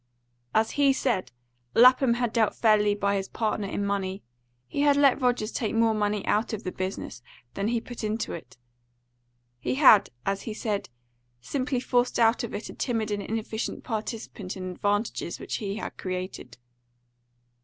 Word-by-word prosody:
As 220 +1 +3
he 280 -1 +4
said, 230 - -1 0.4
Lapham 255 0 +6
had 240 -2 -1
dealt 225 -3 +2
fairly 210 -2 +4
by 200 0 +1
his 195 0 -3
partner 215 -2 -1
in 200 +1 -2
money; 195 -1 -2 0.4
he 285 - -2
had 285 -1 +4
let 280 -1 +4
Rogers 245 -3 +1
take 220 -2 -2
more 225 -1 +4
money 210 -1 0
out 220 +3 +1
of 215 - -4
the 185 - -3
business 185 -10 -5 0.3
than 200 +1 -2
he 235 +1 +1
put 240 0 -9
into 215 +1 -2
it; 130 -7 -9 1.0
he 125 - -1
had, 225 -8 +7 0.2
as 195 0 -1
he 220 - -6
said, 210 -3 -2 0.5
simply 255 - -2
forced 245 0 +1
out 230 0 +3
of 235 - -4
it 210 - -5
a - - -8
timid 225 -4 -1
and 205 0 -1
inefficient 220 +1 -4
participant 215 -4 -5
in 185 -1 -5
advantages 205 -1 -1
which - - -3
he 200 -2 -3
had 220 - -5
created. 185 -9 -5
215 Hz, 165 wpm, -27 LUFS, 200-240 Hz, 1.0 s, had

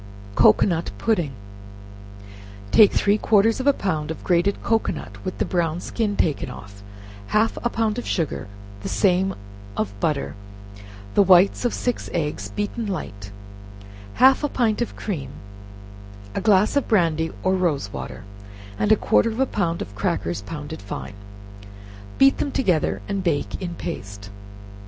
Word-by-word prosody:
Cocoanut 165 - +4
Pudding. 175 -11 0 1.4
Take 210 -3 +7
three 205 +1 +2
quarters 220 +2 +3
of 260 - -2
a - - +8
pound 160 - -2
of 160 - -6
grated 180 +3 +1
cocoanut, 225 -1 -2
with 185 - -4
the - - 0
brown 170 -2 0
skin 210 +1 -2
taken 155 -6 0
off, 100 -1 -11 0.5
half 220 - +2
a 240 - +2
pound 225 -1 -1
of - - -7
sugar, 165 - -2 0.3
the - - -4
same 190 -1 +2 0.4
of 100 -2 -1
butter, 150 0 -1 0.8
the - - +5
whites 190 +4 +5
of 245 - +1
six 245 -1 -2
eggs, 150 -4 -2
beaten 210 +2 -3
light, 100 - -5 0.9
half 265 +2 +5
a 295 - +1
pint 235 -4 0
of 240 - -2
cream, 155 -11 -4 1.0
a - - -2
glass 210 +1 +3
of 285 - +1
brandy, 165 -6 +2
or 185 - +2
rose 155 - 0
water, 105 - -7 0.6
and 210 - +2
a - - +8
quarter 230 - +2
of 225 +2 -5
a 265 - +4
pound 170 -9 -1
of 100 - -12
crackers, 100 -3 -2
pounded 150 +5 -7
fine, 100 +1 -7 1.0
beat 270 0 +5
them 285 - 0
together 160 - 0
and 195 -1 -2
bake 160 -1 -1
in 175 -2 -4
paste. 100 -7 -7
185 Hz, 150 wpm, -23 LUFS, 150-215 Hz, 1.4 s, a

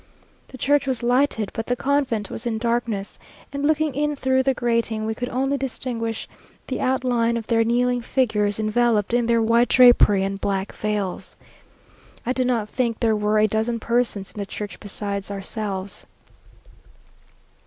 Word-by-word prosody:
The 260 - -11
church 285 +2 +2
was 255 -3 -1
lighted, 245 -3 +1
but 225 - -4
the 245 - +1
convent 255 -6 0
was 235 - -4
in 225 -2 -1
darkness; 230 -3 -2 0.3
and 280 0 -3
looking 310 -1 +2
in 295 +2 0
through 260 -1 +2
the 265 0 +1
grating, 230 -2 0
we 220 - -1
could 245 +3 -4
only 270 +2 0
distinguish 235 -3 -3 0.4
the 260 - -4
outline 250 -3 +1
of 225 - -5
their 225 0 +2
kneeling 245 +1 +1
figures, 220 -5 0
enveloped 220 0 +1
in 240 -1 +2
their 230 -1 +3
white 230 +2 +3
drapery 240 -6 +6
and 195 0 -3
black 195 0 -1
veils. 210 -3 -3 0.9
I 250 - 0
do 260 - 0
not 240 -4 0
think 235 0 -1
there 225 -2 +2
were 210 0 +1
a 215 - +5
dozen 220 +2 -1
persons 235 -4 -1
in - - -10
the 200 - -2
church 205 0 -6
besides 200 -1 -4
ourselves. 200 -1 -5
230 Hz, 165 wpm, -23 LUFS, 215-255 Hz, 0.9 s, drapery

